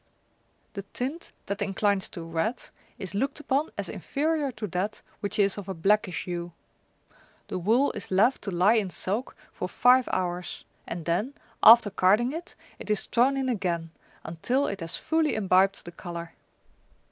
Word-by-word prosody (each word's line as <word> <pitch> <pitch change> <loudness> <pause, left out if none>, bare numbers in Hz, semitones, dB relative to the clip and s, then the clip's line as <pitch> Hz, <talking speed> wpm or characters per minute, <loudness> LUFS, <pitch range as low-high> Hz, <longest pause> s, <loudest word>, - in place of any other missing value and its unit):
The 200 - -4
tint 260 - -5
that 200 0 -4
inclines 200 0 0
to 170 - -7
red 165 +9 -2 0.3
is 190 -1 -6
looked 275 +9 -1
upon 295 +1 0
as - - -2
inferior 300 0 -1
to 215 -1 -5
that 190 +5 -3 0.2
which 200 - -3
is 200 0 +2
of 195 -1 -9
a 190 - -3
blackish 195 +1 +1
hue. 175 -1 -5 1.0
The - - -3
wool 230 +10 +3
is - - -7
left 215 +8 +3
to - - -4
lie 185 +4 +4
in 215 -5 +1
soak 205 +7 -3 0.2
for 180 - -4
five 250 +3 +4
hours, 180 -1 -3 0.2
and 170 -2 -5
then, 210 +12 -1 0.3
after 225 -2 +8
carding 205 +6 +3
it, 330 +3 -7 0.2
it - - -8
is 210 -2 +1
thrown 260 +3 +2
in 265 -1 -1
again, 175 -8 -1 0.3
until 245 - 0
it 200 - -3
has 165 0 -3
fully 320 -1 +1
imbibed 195 -2 +2
the 175 - -8
colour. 170 -1 -7
200 Hz, 165 wpm, -27 LUFS, 180-250 Hz, 1.0 s, after